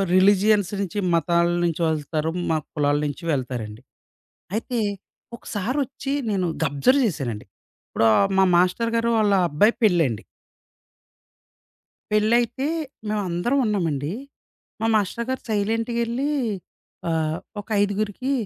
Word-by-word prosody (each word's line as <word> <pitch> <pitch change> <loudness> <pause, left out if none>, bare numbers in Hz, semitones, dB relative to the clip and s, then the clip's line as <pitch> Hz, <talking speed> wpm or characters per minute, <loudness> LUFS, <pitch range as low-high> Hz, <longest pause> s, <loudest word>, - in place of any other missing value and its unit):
Religions 200 +1 +4
నుంచి, 200 +1 -3 0.2
మతాల 170 +1 +2 0.2
నుంచి 170 0 -1
వెళ్తారు. 155 +1 -2 0.2
మా 160 - +2 0.2
కులాల 145 -1 +1
నుంచి 145 +3 -6
వెళ్తారండి. 120 -5 -4 0.8
అయితే 235 +2 -2 0.6
ఒకసారొచ్చి 260 +6 -3 0.2
నేను 190 -3 0 0.2
గబ్జర్వ్ 160 - +3
జేశానండి, 125 - -3 0.4
ఇప్పుడు 115 - +1
ఆహ్, 195 - +4
మా 190 - +6
మాస్టరు 185 +6 +2
గారు 230 0 +1
వాళ్ళ, 210 -2 +3 0.2
అబ్బాయి 205 +11 +4
పెళ్లండి. 165 - +2 1.9
పెళ్లైతే 235 +5 +2 0.4
మేమందరం 205 +4 0
ఉన్నామండి. 165 -8 -1 0.7
మా 225 - +1
మాస్టర్ 215 +3 0
గారు 260 - -3
సైలెంట్‌గేల్లి, 230 +5 0 0.8
ఆహ్, 160 -1 0 0.3
ఒక - - -31
ఐదుగురికి, 205 +6 -1
200 Hz, 105 wpm, -23 LUFS, 160-230 Hz, 1.9 s, మా